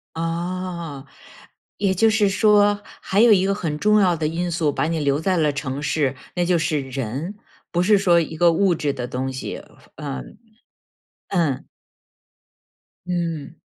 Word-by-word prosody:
啊。 170 Hz, -3 st, -4 dB, 0.7 s
也 195 Hz, -1 st, +1 dB
就 220 Hz, +5 st, +4 dB
是 215 Hz, -2 st, +3 dB
说 205 Hz, 0 st, +4 dB, 0.2 s
还 200 Hz, +3 st, +1 dB
有 235 Hz, 0 st, +7 dB
一 190 Hz, -2 st, +5 dB
个 195 Hz, 0 st, +1 dB
很 155 Hz, -6 st, -3 dB
重 210 Hz, +3 st, +4 dB
要 185 Hz, -3 st, +4 dB
的 155 Hz, -1 st, -1 dB
因 175 Hz, +2 st, -2 dB
素， 165 Hz, -2 st, +1 dB
把 145 Hz, -, -1 dB
你 165 Hz, 0 st, -1 dB
留 140 Hz, -1 st, +1 dB
在 185 Hz, +1 st, +1 dB
了 150 Hz, -2 st, +2 dB
城 140 Hz, -1 st, -4 dB
市， 140 Hz, -2 st, 0 dB, 0.2 s
那 175 Hz, -, +1 dB
就 175 Hz, 0 st, +3 dB
是 155 Hz, -2 st, 0 dB
人。 135 Hz, -, -4 dB, 0.4 s
不 175 Hz, 0 st, +1 dB
是 205 Hz, +2 st, +5 dB
说 175 Hz, -3 st, +4 dB
一 160 Hz, -1 st, -3 dB
个 170 Hz, +1 st, +4 dB
物 185 Hz, +2 st, +3 dB
质 150 Hz, -2 st, -1 dB
的 125 Hz, -3 st, -4 dB
东 130 Hz, +1 st, -3 dB
西。 130 Hz, -, -6 dB, 0.3 s
嗯。 65 Hz, -2 st, -7 dB, 0.9 s
嗯。 160 Hz, -8 st, 0 dB, 1.4 s
嗯。 165 Hz, -4 st, -3 dB
170 Hz, 170 characters per minute, -22 LUFS, 145-185 Hz, 1.4 s, 有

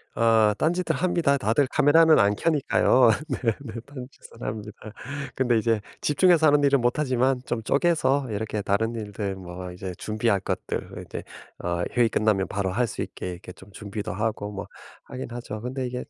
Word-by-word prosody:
어. 110 Hz, -2 st, +4 dB
딴짓들 170 Hz, 0 st, 0 dB
합니다. 170 Hz, -4 st, +2 dB
다들 130 Hz, +2 st, +1 dB
카메라는 160 Hz, +2 st, +5 dB
안 100 Hz, +1 st, +3 dB
켜니까요. 130 Hz, -5 st, +3 dB, 0.2 s
네 125 Hz, -3 st, 0 dB
네. 115 Hz, -6 st, -8 dB
딴짓은 130 Hz, -3 st, -12 dB
합니다. 105 Hz, 0 st, -5 dB, 0.6 s
근데 120 Hz, -3 st, +2 dB
이제 115 Hz, 0 st, +1 dB, 0.2 s
집중해서 160 Hz, +1 st, +4 dB
하는 145 Hz, 0 st, +4 dB
일은 140 Hz, -2 st, +4 dB
못 120 Hz, +4 st, +1 dB
하지만 130 Hz, -2 st, +1 dB
좀 115 Hz, -2 st, -3 dB
쪼개서 140 Hz, -3 st, +2 dB
이렇게 105 Hz, 0 st, -3 dB
다른 105 Hz, +4 st, 0 dB
일들 105 Hz, -2 st, -4 dB
뭐 90 Hz, -1 st, -8 dB
이제 90 Hz, +1 st, -6 dB
준비할 110 Hz, -1 st, 0 dB
것들 -, -, -4 dB, 0.2 s
이제 -, -, -7 dB, 0.4 s
어 85 Hz, 0 st, -1 dB
회의 120 Hz, -2 st, +4 dB
끝나면 105 Hz, -3 st, +1 dB
바로 95 Hz, -2 st, -2 dB
할 105 Hz, +7 st, 0 dB
수 -, -, -5 dB
있게 -, -, -5 dB
이렇게 90 Hz, +1 st, -9 dB
좀 95 Hz, +2 st, -16 dB
준비도 105 Hz, +1 st, -6 dB
하고 105 Hz, 0 st, -2 dB
뭐 100 Hz, -, -6 dB, 0.4 s
하긴 130 Hz, -, -7 dB
하죠. 115 Hz, -3 st, -6 dB
근데 130 Hz, +2 st, -3 dB
이게 125 Hz, 0 st, -4 dB
115 Hz, 345 characters per minute, -25 LUFS, 105-135 Hz, 0.6 s, 카메라는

